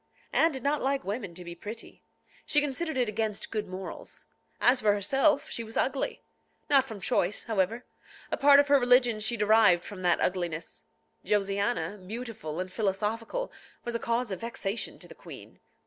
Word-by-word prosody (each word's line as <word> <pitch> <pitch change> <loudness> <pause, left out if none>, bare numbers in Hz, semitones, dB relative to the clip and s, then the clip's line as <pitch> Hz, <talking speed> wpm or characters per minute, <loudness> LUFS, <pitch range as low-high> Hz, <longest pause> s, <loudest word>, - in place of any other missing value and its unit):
Anne 330 - +4
did 265 -4 -6
not 290 +1 +1
like 275 +1 0
women 200 -4 -4
to 180 - -7
be 170 - -6
pretty. 210 +6 -9 0.4
She 295 - +4
considered 295 +1 -2
it 250 -2 +2
against 215 -1 -2
good 215 -2 -2
morals. 185 +1 -8 0.3
As 250 +1 +4
for 210 -1 +4
herself, 270 +9 +2
she 230 - -3
was 225 0 -7
ugly. 270 0 -1 0.5
Not 270 -2 +6
from 220 -5 -8
choice, 185 +1 0
however. 220 +2 -1 0.5
A - - +2
part 280 0 +7
of 285 - +4
her 285 -1 +5
religion 245 -2 +4
she 220 +2 0
derived 210 -4 +5
from 200 -2 -8
that 175 -1 +3
ugliness. 165 - -2 0.4
Josiana, 200 -2 0
beautiful 210 -5 -6
and 185 0 -4
philosophical, 220 - -2 0.3
was 240 - -3
a 230 - -1
cause 235 -1 -1
of 190 - -4
vexation 230 -2 -3
to - - -11
the - - -11
queen. - - -12
220 Hz, 175 wpm, -29 LUFS, 195-250 Hz, 0.5 s, part